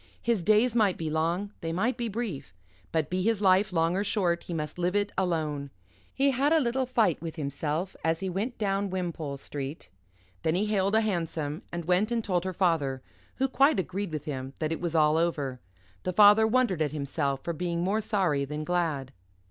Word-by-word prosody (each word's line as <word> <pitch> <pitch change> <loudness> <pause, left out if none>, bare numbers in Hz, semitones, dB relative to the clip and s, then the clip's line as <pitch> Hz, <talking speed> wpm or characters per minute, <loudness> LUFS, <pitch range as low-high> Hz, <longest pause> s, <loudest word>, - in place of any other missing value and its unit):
His 230 -6 0
days 215 +5 +4
might 210 -5 +3
be 160 -2 -3
long, 170 +6 0
they 165 - -3
might 220 +10 0
be 240 -2 -2
brief; 195 - -5 0.4
but 160 -1 0
be 185 +1 0
his 220 +1 +1
life 195 0 +4
long 165 0 +1
or 195 - +1
short, 180 -5 0
he - - -7
must 155 0 -4
live 180 +2 0
it 205 0 +1
alone. 155 -6 -1 0.4
He 275 +1 +2
had 275 +3 +1
a 325 - +5
little 260 -1 0
fight 225 -9 +2
with 165 -2 -5
himself 150 +4 -3
as 160 0 +1
he 195 - -3
went 205 +7 -3
down 200 -1 0
Wimpole 170 -6 -3
Street; 135 - -6 0.5
then 160 +1 +1
he 200 +4 +1
hailed 200 -1 +1
a 220 - +5
hansom, 165 -7 -2
and 170 -1 -4
went 180 +5 +2
and 235 -1 0
told 180 -3 0
her 185 - -1
father, 155 -8 0 0.3
who 270 - +1
quite 275 -1 +3
agreed 190 0 -3
with 155 -2 -4
him 135 -2 -5
that 155 -1 -2
it 165 - -3
was 170 -2 -2
all 155 0 +4
over. 145 -6 -1 0.4
The 185 - -2
father 210 +3 +7
wondered 220 -8 +2
at 150 -3 +1
himself 140 -1 -2
for 170 - -2
being 170 +1 -2
more 205 +4 +1
sorry 185 -10 +1
than 150 +2 -4
glad. 155 -6 -1
175 Hz, 205 wpm, -28 LUFS, 155-205 Hz, 0.5 s, father